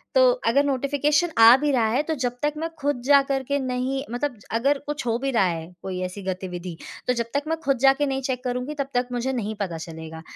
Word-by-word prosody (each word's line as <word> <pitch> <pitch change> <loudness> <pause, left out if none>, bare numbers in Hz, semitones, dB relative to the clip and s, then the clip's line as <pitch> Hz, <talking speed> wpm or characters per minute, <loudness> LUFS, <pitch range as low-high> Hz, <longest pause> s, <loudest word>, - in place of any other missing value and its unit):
तो - - +6 0.2
अगर 280 +5 +4
नोटिफ़िकेशन 285 +4 +1
आ 230 +2 +10
भी 290 +1 0
रहा 235 -4 +2
है 255 +6 +2
तो 320 - -2
जब 245 0 -1
तक 295 0 +1
मैं 325 +2 -2
खुद 285 -3 -1
जाकर 275 -1 +4
के 280 +2 -1
नहीं 260 +1 -2
मतलब 245 -1 -2 0.2
अगर 275 +5 +2
कुछ 295 -3 -3
हो 230 0 +1
भी 270 +1 -1
रहा 225 -5 +3
है 165 0 -3
कोई 185 -1 -4
ऐसी 185 +2 -7
गतिविधि 180 -2 -5 0.3
तो 250 - +3
जब 235 -1 -1
तक 285 0 0
मैं 325 +1 0
खुद 275 -2 +2
जाके 270 +2 +4
नहीं 270 -1 -1
चेक 255 -1 -3
करुँगी 250 +3 -2
तब 275 - 0
तक 245 0 +1
मुझे 245 +2 -1
नहीं 220 -3 -3
पता 175 -4 -2
चलेगा। 160 0 -8
255 Hz, 230 wpm, -24 LUFS, 225-280 Hz, 0.3 s, आ